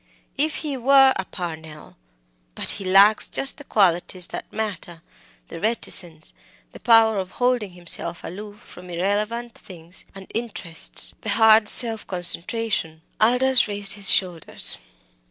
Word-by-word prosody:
If 300 +2 -1
he 285 -3 -3
were 270 +1 +4
a 190 - -4
Parnell! 160 -4 -9 0.6
But - - -2
he 200 - -7
lacks 195 +3 +4
just 270 - -1
the - - -11
qualities 180 -4 0
that - - -9
matter 185 -6 -6 0.5
the - - -9
reticence, 175 -6 -2 0.4
the - - -13
power 225 -3 +4
of 190 0 -7
holding 245 -6 -1
himself 175 -1 -3
aloof 205 +3 -10
from 180 -5 -15
irrelevant 210 +7 -3
things 175 -2 -12
and 195 0 -11
interests, 210 -8 -1
the 220 - -5
hard 220 0 +4
self 225 -3 +1
concentration." 175 -1 +1 0.2
Aldous 250 +3 +3
raised 205 -1 -1
his 200 -2 +3
shoulders. 175 -4 +1
205 Hz, 135 wpm, -22 LUFS, 175-230 Hz, 0.6 s, were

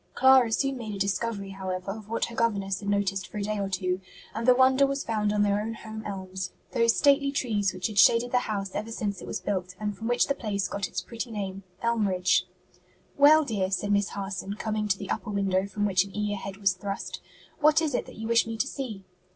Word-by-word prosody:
Clara 260 -3 +6
soon 270 +3 0
made 215 -3 -5
a - - -5
discovery, 200 0 -2
however, 190 0 -4
of 215 0 -9
what 230 - 0
her 235 - -9
governess 200 -5 0
had 200 - -4
noticed 195 -1 0
for - - -8
a 205 - -2
day 210 0 -2
or 195 -1 -2
two, 185 -1 -1 0.3
and 225 +3 -3
the 250 - +7
wonder 265 +2 +5
was 275 0 -2
found 210 -2 0
on 210 0 +2
their 205 0 +2
own 225 +1 -4
home 220 0 -8
elms, 190 -2 -5 0.2
those 230 0 +3
stately 280 -1 +4
trees 215 -8 0
which 185 0 -6
had 205 0 0
shaded 230 +5 +5
the 250 - +4
house 200 -5 -3
ever 215 +2 -4
since 205 -4 -3
it - - -9
was - - -3
built, 185 -2 -3
and 210 -1 -2
from 225 - -5
which 245 0 +3
the 280 - 0
place 200 -7 -2
got 200 -1 -3
its - - -3
pretty 230 +1 -6
name 195 -3 -4 0.2
Elmridge. 190 -6 +2 0.7
"Well, 300 +2 +7
dear," 200 -7 -1
said 205 +2 -1
Miss 200 0 +2
Harson, 195 0 -4
coming 215 -1 -2
to 195 -1 +1
the 195 -1 -6
upper 230 - -3
window 195 -1 +1
from 205 +1 -2
which 190 -2 +3
an 200 +1 -10
eager 210 -1 -1
head 195 0 -7
was 195 -2 +2
thrust, 195 +2 -5 0.4
"what 305 +1 +5
is 315 -4 -1
it - - -1
that - - -11
you 220 +1 -5
wish 230 0 +3
me 225 0 -4
to 240 - +1
see?" 240 -9 -6
205 Hz, 235 wpm, -27 LUFS, 195-230 Hz, 0.7 s, the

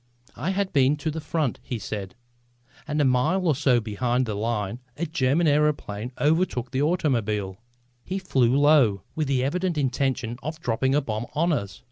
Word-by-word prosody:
"I 150 +9 -3
had 195 0 -1
been 140 0 +4
to 155 +1 -3
the 160 +1 -5
front," 155 -5 -1
he 125 - -4
said, 100 0 -6 0.7
"and 150 0 -1
a 145 - +4
mile 130 +9 +2
or 160 - +4
so 130 -3 +3
behind 120 +3 -1
the 110 - -3
line 105 +1 -2 0.2
a 170 - -1
German 150 +1 +1
aëroplane 145 -7 +1
overtook 150 -5 +1
the 135 0 0
automobile. 110 - 0 0.4
He 190 - -3
flew 135 -9 +2
low, 140 -10 +4
with 155 -2 -1
the 130 -2 +1
evident 175 +4 -1
intention 130 -3 -1
of 155 +4 -5
dropping 130 0 0
a 145 - +3
bomb 110 -2 -4
on 165 +3 +2
us. 100 -8 -3
135 Hz, 175 wpm, -25 LUFS, 120-155 Hz, 0.7 s, been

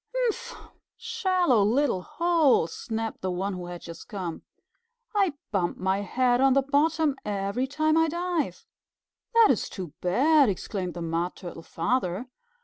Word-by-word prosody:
"Humph! 475 -1 -1 0.4
Shallow 370 - +2
little 235 -1 +2
hole!" 330 - +3
snapped 225 +6 -5
the 185 - -2
one 190 +2 -2
who 180 -1 -6
had 175 -1 -7
just 165 -1 -10
come. 180 -6 -5 0.7
"I 390 -7 +2 0.2
bump 185 -4 0
my 190 +1 0
head 245 +5 +1
on 270 -1 +5
the 275 0 +3
bottom 295 +1 +2
every 200 +5 -1
time 310 +3 +1
I 325 0 +4
dive." 345 -1 -2 0.7
"That 460 -2 +7
is 230 - -1
too 180 -6 -7
bad," 270 - +4
exclaimed 185 -1 -3
the 170 - -4
Mud 165 +2 -2
Turtle 175 -3 -8
Father. 185 +4 -1
245 Hz, 145 wpm, -27 LUFS, -, 0.7 s, That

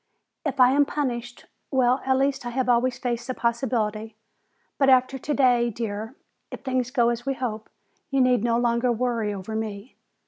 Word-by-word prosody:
If 280 -4 -3
I 250 0 +7
am 285 +2 +4
punished, 245 -5 -4 0.2
well, 255 -1 +2
at 265 0 +3
least 275 0 0
I 240 - -4
have 255 +1 -1
always 245 +1 +2
faced 240 -2 -3
the 255 - -3
possibility. 225 -3 -1 0.6
But 275 -1 +4
after 260 +1 +3
today, 250 -4 +2
dear, 220 +1 -5 0.3
if - - -8
things 255 -2 -1
go 240 -3 +2
as 240 0 -2
we 270 - 0
hope, 220 -4 -4 0.4
you 275 -1 0
need 250 -3 +3
no 235 -1 +2
longer 240 +1 +1
worry 235 -2 -1
over 200 +2 -6
me. 220 +1 -5
245 Hz, 175 wpm, -25 LUFS, 230-260 Hz, 0.6 s, I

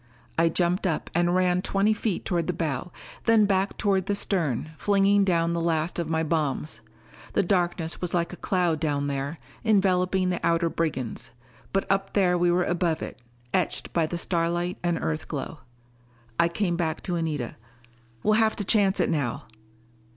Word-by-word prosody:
I 165 0 +3
jumped 180 +3 +1
up 160 - -2
and 175 +1 +2
ran 180 -1 +2
twenty 200 +3 +2
feet 215 -2 -2
toward 170 -3 0
the 180 - 0
bow; 160 -1 -3 0.3
then 225 -2 +5
back 195 0 +1
toward 195 -3 +1
the 205 - +1
stern, 155 - -1
flinging 200 +2 +3
down 170 -3 +2
the 170 - -1
last 165 +1 0
of 165 -2 -2
my 160 0 +1
bombs. 155 -4 -1 0.5
The - - +3
darkness 175 -3 0
was 180 -1 -1
like 170 0 0
a - - -8
cloud 175 -4 0
down 145 -2 0
there, 140 +2 -3 0.3
enveloping 190 -3 +2
the 180 - -3
outer 170 0 +2
brigands. 135 -8 -2 0.4
But 195 - 0
up 195 0 0
there 185 -3 +3
we 175 0 +2
were 175 +1 +3
above 175 -2 0
it, 130 - -8 0.3
etched 185 - -1
by 165 -2 +2
the 175 - -3
starlight 175 +1 -1
and 175 -1 0
Earthglow. 80 - -4 0.8
I 170 - +5
came 175 0 -1
back 160 -2 -2
to 180 - -2
Anita. 155 -7 -2 0.7
"We'll 215 - +3
have 220 -1 +2
to 205 - -2
chance 200 -1 +3
it - - +3
now." 140 -7 -1
175 Hz, 175 wpm, -26 LUFS, 165-190 Hz, 0.8 s, then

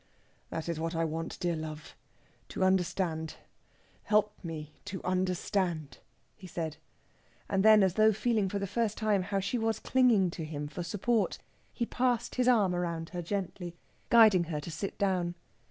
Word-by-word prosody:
"That 160 - -4
is 165 -2 -2
what 165 +1 -2
I 165 0 +1
want, 165 +1 -4
dear 175 -2 0
love 155 -1 -7 0.5
to - - -2
understand. 180 -3 0 0.7
Help 210 0 +3
me 155 -3 -6
to 195 -2 -5
understand," 180 -4 -1 0.4
he 185 - -11
said. 160 -3 -4 0.7
And 195 -1 +1
then, 215 -1 +7
as 190 -2 +2
though 215 +2 +5
feeling 215 -2 +1
for 200 - -2
the 200 - -2
first 215 +2 -1
time 215 -3 +2
how 195 +2 -1
she 200 +6 -1
was 225 0 0
clinging 235 -9 +3
to 165 - -6
him 150 -1 -4
for 155 +4 -6
support, 210 +5 0 0.3
he 235 - -2
passed 245 -1 0
his 250 -1 +1
arm 210 -7 +4
round 170 -2 -2
her 180 -1 -4
gently, 180 -1 -4 0.3
guiding 215 -7 +7
her 155 -2 -3
to 165 - -7
sit 160 +6 -4
down. 180 -3 0
185 Hz, 170 wpm, -30 LUFS, 165-210 Hz, 0.7 s, then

